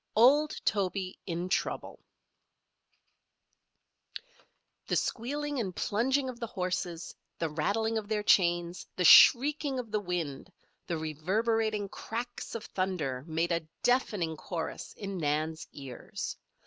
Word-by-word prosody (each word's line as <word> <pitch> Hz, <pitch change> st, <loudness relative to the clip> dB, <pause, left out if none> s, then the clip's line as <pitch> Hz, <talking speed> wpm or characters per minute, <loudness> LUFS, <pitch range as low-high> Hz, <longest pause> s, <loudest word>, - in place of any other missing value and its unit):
OLD 285 Hz, +7 st, +5 dB
TOBY 190 Hz, -2 st, -1 dB
IN 175 Hz, 0 st, -2 dB
TROUBLE 185 Hz, -, -2 dB, 2.9 s
The -, -, +1 dB
squealing 290 Hz, +4 st, -1 dB
and 190 Hz, -6 st, -3 dB
plunging 260 Hz, +6 st, +1 dB
of 250 Hz, -2 st, -6 dB
the 230 Hz, -, -3 dB
horses, 180 Hz, -3 st, -3 dB, 0.2 s
the 165 Hz, -, -1 dB
rattling 220 Hz, +9 st, 0 dB
of 210 Hz, -, -9 dB
their 210 Hz, -1 st, -1 dB
chains, 175 Hz, -3 st, +2 dB
the 180 Hz, -, 0 dB
shrieking 280 Hz, -, +7 dB
of 240 Hz, -4 st, -5 dB
the 210 Hz, -, +1 dB
wind, 175 Hz, -4 st, -4 dB, 0.4 s
the 170 Hz, -, -1 dB
reverberating 205 Hz, +7 st, 0 dB
cracks 240 Hz, +5 st, -6 dB
of 225 Hz, -, -5 dB
thunder 165 Hz, -9 st, -2 dB
made 165 Hz, +2 st, 0 dB
a 165 Hz, -2 st, -1 dB, 0.2 s
deafening 205 Hz, -10 st, +1 dB
chorus 165 Hz, 0 st, -5 dB
in 195 Hz, -2 st, -5 dB
Nan's 155 Hz, +1 st, -1 dB
ears. 135 Hz, -4 st, -6 dB
190 Hz, 120 wpm, -30 LUFS, 170-230 Hz, 2.9 s, shrieking